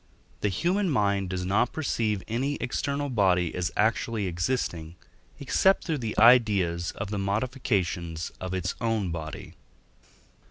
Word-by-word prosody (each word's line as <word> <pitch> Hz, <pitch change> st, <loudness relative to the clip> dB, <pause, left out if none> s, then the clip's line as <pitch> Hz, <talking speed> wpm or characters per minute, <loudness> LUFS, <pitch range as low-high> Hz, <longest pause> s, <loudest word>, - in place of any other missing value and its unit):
The 105 Hz, -, 0 dB
human 180 Hz, -, 0 dB
mind 100 Hz, -, +1 dB
does 90 Hz, -1 st, -3 dB
not 100 Hz, +6 st, +1 dB
perceive 110 Hz, -, -1 dB
any 130 Hz, +6 st, -1 dB
external 140 Hz, +3 st, -2 dB
body 95 Hz, -, +2 dB
as 90 Hz, -1 st, -1 dB
actually 110 Hz, 0 st, +1 dB
existing, 85 Hz, -3 st, -2 dB, 0.4 s
except 190 Hz, +7 st, +3 dB
through 160 Hz, -4 st, -2 dB
the 115 Hz, -3 st, -4 dB
ideas 100 Hz, -8 st, +4 dB
of 100 Hz, 0 st, -5 dB
the 105 Hz, -, -2 dB
modifications 100 Hz, -, -1 dB
of 95 Hz, 0 st, -3 dB
its 90 Hz, 0 st, -2 dB
own 110 Hz, -6 st, 0 dB
body. 80 Hz, -1 st, -6 dB
105 Hz, 130 wpm, -27 LUFS, 90-125 Hz, 0.4 s, ideas